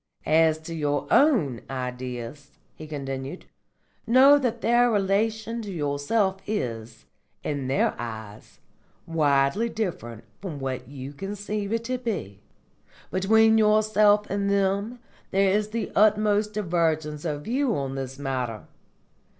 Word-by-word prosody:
"As 160 0 +4
to 165 +1 -7
your 145 -3 -1
own 175 - +3
Ideas," 125 +2 -6 0.2
he 155 - -10
continued, 135 +1 -6 0.6
"know 270 +5 +7
that 240 -3 -2
their 240 +1 +4
relation 220 +2 0
to 205 -3 -6
yourself 170 +6 0
is, 115 - -4 0.4
in 140 -3 -3
their 135 - +1
eyes, 110 -3 -8 0.5
widely 150 +6 +2
different 160 - -4 0.2
from 180 -7 -5
what 130 -2 -4
you 135 0 -8
conceive 205 +4 -4
it 230 0 -1
to 255 +1 -3
be. 185 - -4 0.7
Between 220 +4 +4
yourself 210 -1 +4
and 200 0 -1
them 200 +4 0 0.3
there 195 0 +3
is 210 +1 +1
the 220 -1 -3
utmost 210 0 +3
divergence 160 -6 -1
of 150 -3 -3
view 250 - 0
on 135 -1 -3
this 135 0 -5
matter. 130 -6 -3
180 Hz, 125 wpm, -25 LUFS, 135-215 Hz, 0.7 s, know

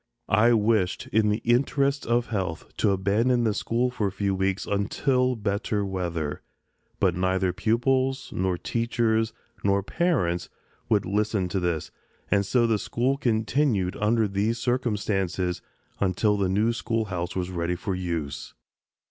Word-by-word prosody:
I 115 +4 +5
wished, 105 -4 +1
in 105 0 +4
the 105 +2 -1
interest 140 +3 +2
of 120 0 +1
health, 95 -7 -4
to - - +2
abandon 105 +6 +2
the 110 -2 +2
school 120 +4 0
for 110 -5 -1
a - - -2
few 100 0 -1
weeks 95 +1 -1
until 125 +6 +1
better 105 -1 -1
weather; 85 -6 -3 0.6
but 95 -3 +3
neither 95 0 +1
pupils, 130 +4 0
nor 90 -1 0
teachers, 115 0 0 0.3
nor 100 0 +2
parents 95 - 0 0.4
would 105 -3 +2
listen 105 -1 0
to 95 - -1
this, 85 -3 -2 0.4
and 100 -1 +4
so 120 +2 +3
the 110 -2 +2
school 125 +6 0
continued 115 -5 +1
under 110 +1 +2
these 100 +4 0
circumstances 105 -7 -1 0.4
until 100 +2 +2
the 100 -2 0
new 105 +5 +2
schoolhouse 105 -7 -2
was 90 -1 -2
ready 85 0 -1
for 95 +2 -3
use. 85 -6 -4
105 Hz, 140 wpm, -26 LUFS, 95-115 Hz, 0.6 s, I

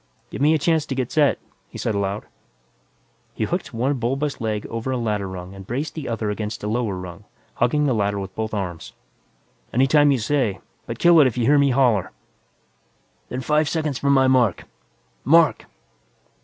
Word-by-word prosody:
"Give - - -6
me 155 +2 +4
a - - +3
chance 155 0 +1
to 135 - -3
get 130 -2 -2
set," 150 -3 +3 0.3
he - - -10
said 110 - -1
aloud. 100 +1 -2 1.1
He - - -2
hooked - - -2
one 130 +4 -1
bulbous 135 +4 -2
leg 110 -2 -2
over 115 +3 -5
a 130 - 0
ladder 105 -4 -2
rung 90 0 -8
and 95 -1 -11
braced 140 +6 -3
the 150 -6 -6
other 110 -2 -2
against 105 +1 -5
a - - -2
lower 110 -2 -1
rung, 90 -2 -9 0.3
hugging 145 +5 +2
the 135 - +2
ladder 100 -2 0
with 95 -1 -6
both 110 0 -3
arms. 90 -6 -5 0.8
"Any 130 +3 +3
time 145 +1 +4
you 135 - +2
say, 115 -4 0 0.3
but - - -5
kill 170 -1 +6
it 145 - +7
if 125 - -4
you 120 - +1
hear 145 +3 +5
me 140 0 +4
holler!" 120 -8 +2 1.2
"Then 125 - -4
five 150 +2 +1
seconds 155 -5 -2
from 140 0 +2
my 135 -1 +4
mark 125 -7 +2 0.6
mark!" 165 +2 +4
125 Hz, 190 wpm, -22 LUFS, 105-140 Hz, 1.2 s, it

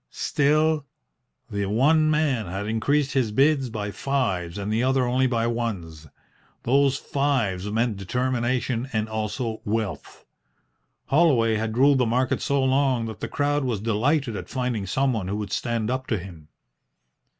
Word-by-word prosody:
Still, 150 0 +1 0.6
the 100 -1 -1
one 155 +9 +3
man 145 -9 +1
had 95 +4 -4
increased 135 +6 +1
his 125 -6 +1
bids 135 +2 +2
by 105 -2 -4
fives 95 -8 -2
and 100 +1 -3
the 115 - +1
other 130 0 +2
only 130 +2 +2
by 115 -2 0
ones. 95 -10 -4 0.6
Those 135 +2 +3
fives 120 -11 -1
meant 115 -1 0
determination 125 +3 -1
and 110 0 0
also 110 +1 -3
wealth. 105 -4 -4 0.8
Holloway 135 -8 +3
had 110 +1 -3
ruled 140 +1 +5
the 125 - +2
market 125 +3 0
so 140 -1 +1
long 130 -3 +2
that 110 -2 -7
the - - -4
crowd 145 0 0
was 120 -6 -1
delighted 115 +4 0
at - - -7
finding 125 -6 -2
someone 120 -3 0
who 100 - -2
would 105 -2 -5
stand 115 -1 -1
up 130 0 -3
to 110 - 0
him. 85 -5 -10
120 Hz, 150 wpm, -24 LUFS, 105-135 Hz, 0.8 s, ruled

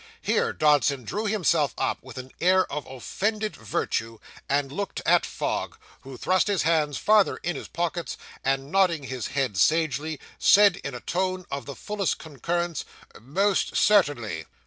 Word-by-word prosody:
Here - - +1
Dodson 145 -3 +2
drew 210 - -3
himself 170 - +1
up, - - -1
with 130 0 -12
an 130 0 -7
air 185 +2 +4
of 150 0 -4
offended 210 - -2
virtue, 115 +1 -3 0.3
and 140 -1 +1
looked 200 +7 -4
at - - +4
Fogg, - - -3 0.2
who 135 -1 -10
thrust 185 - +2
his 200 -4 +1
hands 155 -3 +1
farther 210 -2 +3
in 175 - -1
his - - -7
pockets, 170 0 -3 0.3
and 135 +1 -1
nodding 180 -6 +2
his 130 -3 -4
head 130 -8 -1
sagely, 155 - +1 0.2
said, 200 -2 +6
in 140 -7 -6
a 120 - -7
tone 185 +1 -2
of 140 -3 -4
the 140 - -6
fullest 205 -3 -2
concurrence, 170 +2 -3 0.4
'Most 190 - 0
certainly. 135 - +2
155 Hz, 155 wpm, -26 LUFS, 135-185 Hz, 0.4 s, said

